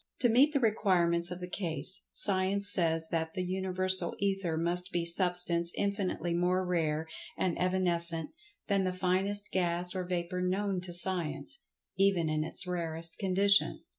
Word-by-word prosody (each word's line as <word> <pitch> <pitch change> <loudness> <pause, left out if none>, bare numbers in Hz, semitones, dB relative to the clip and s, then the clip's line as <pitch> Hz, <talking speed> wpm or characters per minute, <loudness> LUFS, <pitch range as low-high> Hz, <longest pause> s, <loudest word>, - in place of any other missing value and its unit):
To 245 - +4
meet 265 +6 +4
the 285 - +1
requirements 175 -7 +1
of 180 0 -6
the 180 - -5
case, 180 +1 -4
Science 200 +1 +2
says 165 -2 +1
that 160 -1 -2
The 185 - -2
Universal 185 -1 +1
Ether 195 -5 -1
must 175 +2 0
be 175 -1 -1
Substance 175 -1 +2
infinitely 195 -4 -2
more 180 +2 0
rare 160 -3 -1 0.3
and 180 -3 -1
evanescent 170 -3 +1 0.4
than 200 -2 +1
the 185 -1 -1
finest 190 +3 -2
gas 175 -1 0
or 185 -1 -3
vapor 180 0 -3
known 190 +1 -1
to 180 - -7
Science, 175 -3 0 0.4
even 190 -5 +2
in 155 0 -1
its 165 +4 +2
rarest 165 -2 -3
condition. 200 +1 +2
180 Hz, 150 wpm, -30 LUFS, 170-190 Hz, 0.4 s, To